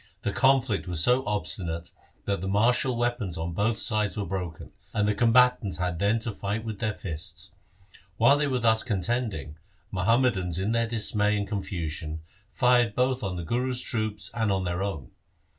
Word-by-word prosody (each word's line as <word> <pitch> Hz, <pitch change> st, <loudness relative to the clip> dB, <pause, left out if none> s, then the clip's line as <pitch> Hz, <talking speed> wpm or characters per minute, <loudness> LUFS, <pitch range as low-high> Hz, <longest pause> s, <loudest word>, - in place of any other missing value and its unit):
The -, -, 0 dB
conflict 130 Hz, -7 st, +2 dB
was 85 Hz, -2 st, 0 dB
so 125 Hz, +5 st, +4 dB
obstinate 85 Hz, -5 st, -3 dB, 0.3 s
that 100 Hz, -3 st, -1 dB
the 95 Hz, -, -3 dB
martial 120 Hz, +5 st, +2 dB
weapons 120 Hz, -7 st, -1 dB
on 80 Hz, +1 st, -3 dB
both 105 Hz, +5 st, +1 dB
sides 105 Hz, -1 st, 0 dB
were 100 Hz, -, -1 dB
broken, 90 Hz, -4 st, -5 dB, 0.2 s
and 105 Hz, -1 st, +2 dB
the 105 Hz, -, +3 dB
combatants 115 Hz, -4 st, +3 dB
had 90 Hz, -2 st, -2 dB
then 100 Hz, +4 st, +3 dB
to 115 Hz, -, -3 dB
fight 105 Hz, +2 st, -3 dB
with 110 Hz, -3 st, -5 dB
their 110 Hz, -2 st, -1 dB
fists. 85 Hz, +1 st, -6 dB, 0.6 s
While 140 Hz, +6 st, +5 dB
they 150 Hz, -, +2 dB
were 130 Hz, -2 st, 0 dB
thus 110 Hz, -2 st, +3 dB
contending, 100 Hz, -, -2 dB, 0.3 s
Muhammadans 95 Hz, -3 st, +2 dB
in 95 Hz, +4 st, 0 dB
their 115 Hz, 0 st, +1 dB
dismay 105 Hz, -2 st, +1 dB
and 100 Hz, -1 st, -2 dB
confusion 80 Hz, -6 st, -4 dB, 0.3 s
fired 120 Hz, -3 st, +3 dB
both 130 Hz, 0 st, +1 dB
on 95 Hz, -3 st, -3 dB
the 85 Hz, -, -4 dB
Guru's 125 Hz, +7 st, -1 dB
troops 110 Hz, -3 st, -2 dB
and 110 Hz, -3 st, 0 dB
on 95 Hz, -1 st, 0 dB
their 90 Hz, 0 st, -2 dB
own. 95 Hz, -10 st, -4 dB
105 Hz, 175 wpm, -27 LUFS, 90-120 Hz, 0.6 s, While